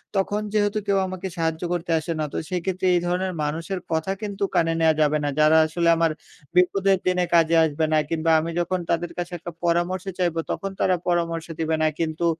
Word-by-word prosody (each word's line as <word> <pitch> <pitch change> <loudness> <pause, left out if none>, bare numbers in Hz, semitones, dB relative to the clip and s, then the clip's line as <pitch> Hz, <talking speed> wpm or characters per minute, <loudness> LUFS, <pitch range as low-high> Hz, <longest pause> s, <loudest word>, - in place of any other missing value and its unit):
তখন 205 +2 0
যেহেতু 205 0 +1
কেউ 200 -1 +3
আমাকে 185 0 -5
সাহায্য 160 -1 -1
করতে 175 0 -3
আসে 160 - -5
না - - 0
তো - - -3
সেক্ষেত্রে 185 +1 -2
এই - - +3
ধরনের 185 +1 -1
মানুষের 165 +5 -3
কথা 160 +3 0
কিন্তু 200 -2 -4
কানে 165 -2 +3
নেওয়া 160 -1 +4
যাবে 150 0 +3
না। 145 - 0
যারা 155 +1 +6
আসলে 170 +2 0
আমার 165 -1 +2 0.4
বিপদের 190 +2 +3
দিনে 180 -1 +2
কাজে 165 -1 +4
আসবে 160 +1 0
না। - - +4
কিংবা 165 0 +1
আমি 160 +2 -3
যখন 185 +1 -1
তাদের 170 +1 0
কাছে 175 0 -4
একটা 175 +2 -7
পরামর্শ 175 +2 0
চাইবো 175 -3 0
তখন 195 - -3
তারা 185 - +3
পরামর্শ 170 -2 0
দিবে 160 0 0
না। 155 - +4
কিন্তু 165 +1 -1
170 Hz, 200 wpm, -24 LUFS, 160-185 Hz, 0.4 s, যারা